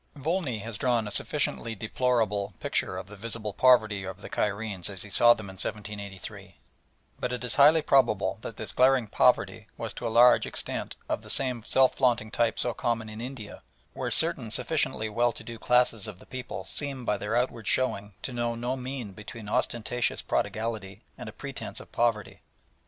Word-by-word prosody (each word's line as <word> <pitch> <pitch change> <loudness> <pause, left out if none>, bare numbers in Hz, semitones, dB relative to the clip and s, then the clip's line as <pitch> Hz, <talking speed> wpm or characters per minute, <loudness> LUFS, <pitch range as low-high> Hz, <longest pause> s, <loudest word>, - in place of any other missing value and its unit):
Volney 150 -3 -1
has 110 0 -7
drawn 120 -4 +1
a - - -6
sufficiently 115 +2 0
deplorable 110 -3 0
picture 95 - -1
of 95 - -5
the 105 +2 -12
visible 110 0 -4
poverty 110 -6 +4
of 95 0 -7
the - - -10
Cairenes 100 -3 -1
as 95 -2 -6
he 105 - -11
saw 120 +3 +6
them 110 - -8
in 95 - -9
1783, 100 -1 -6 0.6
but 125 - -2
it 125 -1 -4
is 125 - -2
highly 150 +2 +6
probable 105 -8 +3
that 115 - -7
this 110 - -4
glaring 130 -1 +4
poverty 105 - +2
was - - -4
to 120 - -4
a - - 0
large 120 +2 +6
extent - - -4
of - - -1
the - - -13
same 125 -4 0
self 130 +3 +4
flaunting 120 -4 +2
type 115 -2 +1
so 120 - +1
common 115 -2 -2
in 110 +1 -8
India, 125 -4 -8 0.3
where - - -3
certain - - +4
sufficiently 110 - 0
well 120 +3 +2
to - - -10
do 115 -1 -8
classes 120 -4 +2
of 105 -4 -8
the - - -16
people 125 -7 -6
seem 140 -4 -2
by 105 - +1
their 105 +2 -2
outward 120 -3 -1
showing 105 -6 +1
to 130 - -4
know 120 -1 -1
no 120 +2 -2
mean 130 -4 -5
between 105 +2 -10
ostentatious 120 +1 -1
prodigality 110 -3 -2
and - - -8
a - - -8
pretence - - -6
of - - -13
poverty. 115 -4 0
115 Hz, 185 wpm, -28 LUFS, 105-125 Hz, 0.6 s, saw